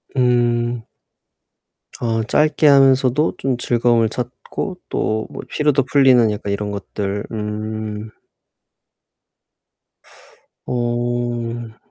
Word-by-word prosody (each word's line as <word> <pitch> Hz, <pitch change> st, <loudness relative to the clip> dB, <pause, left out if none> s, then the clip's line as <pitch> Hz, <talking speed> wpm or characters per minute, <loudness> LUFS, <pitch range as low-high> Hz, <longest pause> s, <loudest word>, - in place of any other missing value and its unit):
음. 120 Hz, -2 st, +1 dB, 1.1 s
어 115 Hz, -1 st, 0 dB
짧게 150 Hz, +5 st, +2 dB
하면서도 135 Hz, +1 st, +4 dB
좀 130 Hz, -2 st, -1 dB
즐거움을 120 Hz, -2 st, +2 dB
찾고 125 Hz, -, -5 dB
또 110 Hz, 0 st, -1 dB
뭐 -, -, -7 dB
피로도 150 Hz, -3 st, +2 dB
풀리는 130 Hz, -4 st, +4 dB
약간 100 Hz, -1 st, -4 dB
이런 105 Hz, 0 st, -3 dB
것들 100 Hz, 0 st, -4 dB
음. 110 Hz, 0 st, -4 dB, 2.6 s
어. 120 Hz, -1 st, -2 dB
120 Hz, 155 characters per minute, -20 LUFS, 110-125 Hz, 2.6 s, 하면서도